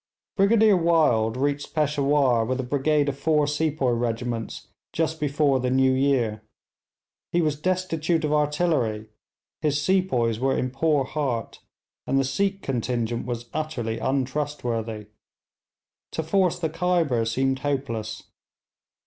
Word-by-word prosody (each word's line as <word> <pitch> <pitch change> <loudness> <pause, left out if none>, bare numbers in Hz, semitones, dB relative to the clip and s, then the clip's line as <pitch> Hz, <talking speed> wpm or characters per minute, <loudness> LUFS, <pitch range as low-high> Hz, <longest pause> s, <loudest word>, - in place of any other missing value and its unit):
Brigadier 210 +1 +5
Wild 150 -10 +2
reached 145 +2 -2
Peshawur 140 -5 +2
with 130 +3 -2
a - - -1
brigade 145 +3 +1
of 140 -1 -3
four 150 0 +2
sepoy 150 -3 0
regiments 115 -1 -3 0.3
just 160 0 -1
before 145 -2 +2
the 125 0 -1
new 130 +1 +3
year. 130 -5 +1 0.9
He 175 - +2
was 155 -3 +1
destitute 170 -3 0
of 150 - 0
artillery, 150 -8 0 0.5
his 145 -1 +1
sepoys 145 - +1
were 135 +1 +1
in 130 - -1
poor 145 +1 +1
heart, 130 -5 -3 0.5
and 135 - +1
the 135 - +3
Sikh 195 +9 -1
contingent 120 -2 -2
was 120 -1 -4
utterly 120 -8 -3
untrustworthy. 125 -5 -2 1.1
To 160 - -2
force 180 +2 +1
the 160 -3 -2
Khyber 165 -8 +1
seemed 130 +3 0
hopeless. 125 -7 -3
140 Hz, 125 wpm, -25 LUFS, 120-155 Hz, 1.1 s, Brigadier